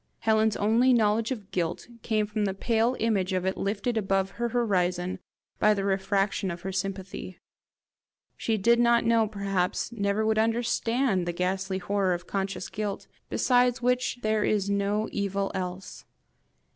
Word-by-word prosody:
Helen's 220 Hz, -1 st, +2 dB
only 230 Hz, +5 st, +3 dB
knowledge 220 Hz, -1 st, +2 dB
of 215 Hz, -7 st, -6 dB
guilt 170 Hz, -2 st, -2 dB
came 215 Hz, -2 st, 0 dB
from 210 Hz, 0 st, -2 dB
the 190 Hz, -1 st, -2 dB
pale 230 Hz, +4 st, +1 dB
image 200 Hz, -5 st, +1 dB
of 185 Hz, 0 st, -1 dB
it 190 Hz, -, 0 dB
lifted 210 Hz, +4 st, -2 dB
above 195 Hz, -2 st, 0 dB
her 235 Hz, +3 st, -2 dB
horizon 185 Hz, -6 st, 0 dB, 0.4 s
by 215 Hz, 0 st, +4 dB
the 195 Hz, -, -2 dB
refraction 195 Hz, 0 st, 0 dB
of 170 Hz, -1 st, -5 dB
her 190 Hz, -, -4 dB
sympathy. 190 Hz, -1 st, -5 dB, 1.0 s
She 225 Hz, -1 st, -1 dB
did 235 Hz, +4 st, +3 dB
not 235 Hz, -1 st, +4 dB
know, 230 Hz, -1 st, +3 dB
perhaps 200 Hz, -2 st, -1 dB
never 205 Hz, -1 st, 0 dB
would 220 Hz, 0 st, +2 dB
understand 230 Hz, -2 st, +1 dB
the 175 Hz, -, -1 dB
ghastly 190 Hz, +2 st, -1 dB
horror 190 Hz, -1 st, 0 dB
of 175 Hz, 0 st, -8 dB
conscious 195 Hz, 0 st, -3 dB
guilt, 205 Hz, -2 st, -4 dB, 0.2 s
besides 245 Hz, -1 st, +2 dB
which 250 Hz, 0 st, +1 dB
there 215 Hz, 0 st, +1 dB
is 200 Hz, -2 st, +1 dB
no 200 Hz, +2 st, 0 dB
evil 200 Hz, -1 st, -1 dB
else. 185 Hz, 0 st, -5 dB
205 Hz, 155 wpm, -27 LUFS, 190-225 Hz, 1.0 s, by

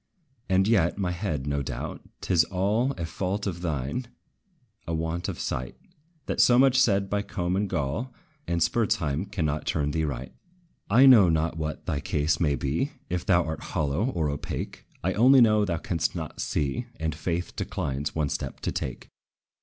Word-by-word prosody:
And 95 Hz, +1 st, +3 dB
yet, 95 Hz, -7 st, +3 dB
my 95 Hz, -3 st, -1 dB
head, 85 Hz, -7 st, -3 dB
no 70 Hz, 0 st, -1 dB
doubt, -, -, -5 dB, 0.2 s
't -, -, -1 dB
is 85 Hz, -2 st, +6 dB
all 105 Hz, +8 st, +1 dB
A 85 Hz, -, -4 dB
fault 95 Hz, +4 st, -3 dB
of 90 Hz, -3 st, -3 dB
thine, 80 Hz, -, -2 dB, 0.8 s
a 85 Hz, -, -1 dB
want 80 Hz, +2 st, -2 dB
of -, -, -5 dB
sight, 60 Hz, 0 st, -3 dB, 0.5 s
That -, -, +1 dB
so 120 Hz, -, +6 dB
much 130 Hz, 0 st, +5 dB
said 100 Hz, -5 st, +3 dB
by 100 Hz, +1 st, 0 dB
Combe 90 Hz, -3 st, -2 dB
and 100 Hz, 0 st, 0 dB
Gall 75 Hz, -, -2 dB, 0.4 s
And 85 Hz, 0 st, 0 dB
Spurzheim 85 Hz, -5 st, 0 dB
cannot 75 Hz, -7 st, -1 dB
turn 75 Hz, -1 st, 0 dB
thee 80 Hz, +1 st, 0 dB
right. 65 Hz, -3 st, -5 dB, 0.6 s
I 120 Hz, +7 st, +7 dB
know 115 Hz, -9 st, +8 dB
not 80 Hz, 0 st, +1 dB
what 75 Hz, -2 st, -4 dB
thy 70 Hz, -, -1 dB
case 75 Hz, +3 st, 0 dB
may 75 Hz, -4 st, +2 dB
be, 80 Hz, -, -1 dB, 0.2 s
If 90 Hz, -1 st, -2 dB
thou 90 Hz, -2 st, +4 dB
art 80 Hz, -2 st, -4 dB, 0.2 s
hollow, 75 Hz, +7 st, +1 dB
or 80 Hz, -, -1 dB
opaque; 70 Hz, -, -5 dB, 0.2 s
I 95 Hz, +2 st, +1 dB
only 130 Hz, +6 st, +6 dB
know 110 Hz, -3 st, +5 dB
thou 85 Hz, -3 st, -1 dB
canst 85 Hz, 0 st, -1 dB
not -, -, -5 dB
see, 75 Hz, -, -1 dB
And 80 Hz, -1 st, -1 dB
faith 85 Hz, +3 st, -3 dB
declines 70 Hz, +2 st, -3 dB
one 75 Hz, -3 st, 0 dB
step -, -, -4 dB
to -, -, -1 dB
take. -, -, -5 dB
85 Hz, 180 wpm, -27 LUFS, 75-100 Hz, 0.8 s, know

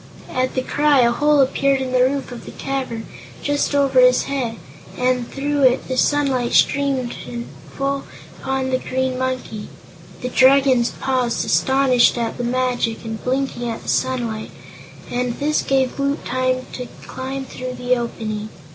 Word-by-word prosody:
At 255 Hz, 0 st, 0 dB
the 255 Hz, -, 0 dB
cry 290 Hz, -1 st, +3 dB
a 235 Hz, -1 st, +4 dB
hole 295 Hz, +3 st, +3 dB
appeared 275 Hz, +1 st, +2 dB
in 260 Hz, -1 st, -3 dB
the 255 Hz, 0 st, +3 dB
roof 270 Hz, +1 st, 0 dB
of 245 Hz, -, -8 dB
the -, -, -8 dB
cavern, 255 Hz, -5 st, -4 dB, 0.4 s
just 290 Hz, 0 st, 0 dB
over 280 Hz, -, +3 dB
his -, -, +6 dB
head, 255 Hz, -5 st, -2 dB, 0.4 s
and 250 Hz, -1 st, +1 dB
through 285 Hz, +1 st, -1 dB
it 255 Hz, -1 st, +3 dB
the 260 Hz, -, -2 dB
sunlight 265 Hz, -3 st, +1 dB
streamed 270 Hz, -3 st, +2 dB, 0.6 s
full 275 Hz, 0 st, -1 dB, 0.3 s
upon 265 Hz, 0 st, -2 dB
the 255 Hz, -, +1 dB
Green 260 Hz, 0 st, -1 dB
Monkey. 255 Hz, -5 st, -3 dB, 0.5 s
The 250 Hz, -, -2 dB
Dragons 260 Hz, -2 st, +5 dB
paused, 255 Hz, -3 st, 0 dB
astonished 265 Hz, -3 st, +3 dB
at 230 Hz, 0 st, -2 dB
the -, -, -1 dB
magic 245 Hz, -2 st, -1 dB
and 220 Hz, -1 st, -5 dB
blinking 255 Hz, -2 st, -1 dB
at 225 Hz, -, -5 dB
the -, -, -6 dB
sunlight, 240 Hz, -4 st, -1 dB, 0.6 s
and 245 Hz, -1 st, -1 dB
this 300 Hz, +1 st, +1 dB
gave 265 Hz, 0 st, 0 dB
Woot 280 Hz, +1 st, -1 dB
time 255 Hz, 0 st, 0 dB
to 250 Hz, -1 st, -5 dB, 0.2 s
climb 265 Hz, +1 st, -5 dB
through 255 Hz, -1 st, -6 dB
the 250 Hz, 0 st, +1 dB
opening. 215 Hz, -3 st, -4 dB
255 Hz, 155 wpm, -20 LUFS, 245-275 Hz, 0.6 s, his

